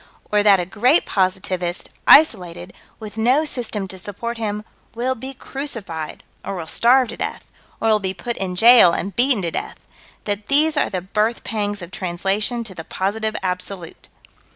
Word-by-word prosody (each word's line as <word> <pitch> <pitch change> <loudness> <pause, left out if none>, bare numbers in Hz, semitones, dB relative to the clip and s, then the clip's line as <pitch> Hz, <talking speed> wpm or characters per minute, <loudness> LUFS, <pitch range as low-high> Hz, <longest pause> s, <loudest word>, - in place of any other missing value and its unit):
Or 210 0 +3
that 205 -2 +5
a 175 - -1
great 230 - +3
positivist 185 -2 -2 0.2
isolated 180 - +4 0.3
with 215 -1 -9
no 255 +8 +3
system 225 -8 -2
to 190 - -8
support 230 +5 -6
him 210 -1 -3 0.3
will 250 +3 0
be 265 +2 -8
crucified, 215 - -6 0.2
or 195 - -4
will 170 -3 -5
starve 245 +7 +3
to - - -7
death, - - -4 0.4
or 225 - 0
will 215 -1 +4
be 190 -1 -3
put 240 -1 -4
in 185 -2 -3
jail 225 -3 +7
and 195 +2 -3
beaten 245 -4 +3
to 170 - -2
death - - -5 0.5
that 205 0 -3
these 305 +3 +4
are - - +1
the 185 -2 -3
birth 215 +5 -1
pangs 205 -3 -3
of 175 - -10
translation 195 +6 -1
to 215 -4 -8
the 165 - -8
Positive 215 +5 -2
Absolute. 180 -1 -5
210 Hz, 175 wpm, -20 LUFS, 185-235 Hz, 0.5 s, jail